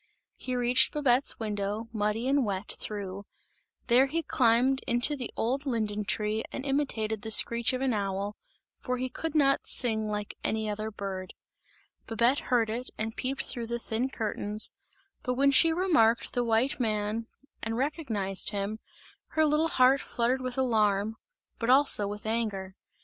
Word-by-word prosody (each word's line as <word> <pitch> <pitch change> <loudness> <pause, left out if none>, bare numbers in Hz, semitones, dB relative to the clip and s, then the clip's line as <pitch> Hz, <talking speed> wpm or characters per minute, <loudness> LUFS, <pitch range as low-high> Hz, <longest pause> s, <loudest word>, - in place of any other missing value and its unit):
He 255 - -3
reached 245 +1 +3
Babette's 275 -2 +2
window, 210 0 -3
muddy 215 +3 -1
and 275 0 +2
wet 200 -2 -3
through, 200 -1 -6 0.6
there 255 +3 +4
he 330 +4 -2
climbed 255 0 +2
into 240 +5 +2
the 250 -4 -5
old 270 +5 -1
linden 215 -4 -1
tree 215 +2 -1
and 270 - -6
imitated 225 -7 -1
the 220 - -6
screech 235 +2 +5
of 255 0 -3
an 265 -2 +1
owl, 200 0 -2 0.4
for 250 -1 -3
he 255 +1 -3
could 320 +5 -5
not 275 -2 +3
sing 220 -3 +4
like 210 -1 -4
any 220 0 -1
other 215 +1 -3
bird. 195 -3 -6 0.7
Babette 235 +4 +2
heard 230 -3 +2
it 245 +3 -5
and 225 +1 -4
peeped 270 +2 -3
through 235 -2 -4
the 235 +1 -2
thin 235 +2 -3
curtains, 215 -3 0 0.5
but 250 0 -2
when 275 +2 +3
she 325 +4 +6
remarked 315 -11 +2
the 245 - 0
white 235 +4 +1
man 215 -1 -1 0.3
and 225 +1 -3
recognized 235 - -1
him, 205 +1 -4 0.5
her 315 0 +3
little 305 +2 +2
heart 265 -2 +4
fluttered 245 +2 -1
with 255 0 -5
alarm, 215 -4 +1 0.4
but 230 - -2
also 260 -6 +6
with 205 +1 -7
anger. 210 -4 -3
230 Hz, 160 wpm, -28 LUFS, 210-260 Hz, 0.7 s, she